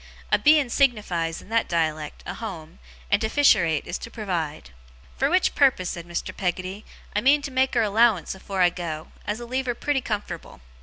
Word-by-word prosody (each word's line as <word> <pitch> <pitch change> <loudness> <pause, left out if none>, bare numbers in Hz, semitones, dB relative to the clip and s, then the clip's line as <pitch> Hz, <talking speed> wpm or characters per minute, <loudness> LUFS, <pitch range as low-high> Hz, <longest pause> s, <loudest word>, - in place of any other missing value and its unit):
(A - - +4
Beein' 295 -4 +4
signifies, 205 - +1
in - - -17
that 230 0 +1
dialect, 155 -3 -2
a - - -4
home, 175 - -8 0.3
and - - +3
to 220 - 0
fisherate 170 - +3
is - - -4
to - - -8
provide.) 170 - -4 0.4
'Fur - - +1
which 365 +1 +2
purpose,' 260 -11 +3
said 170 -1 -7
Mr. 170 -1 -4
Peggotty, 185 +2 -3 0.3
'I 210 - +2
means 285 +4 +4
to 280 - -5
make 260 0 +1
her 235 - +4
a 215 - 0
'lowance 220 -4 +3
afore 190 0 -1
I 175 - +5
go, 160 -3 -5 0.2
as'll 215 +4 -3
leave 260 +2 -2
her 245 - 0
pretty 285 +2 0
comfort'ble. 205 - -5
210 Hz, 195 wpm, -24 LUFS, 170-245 Hz, 0.4 s, I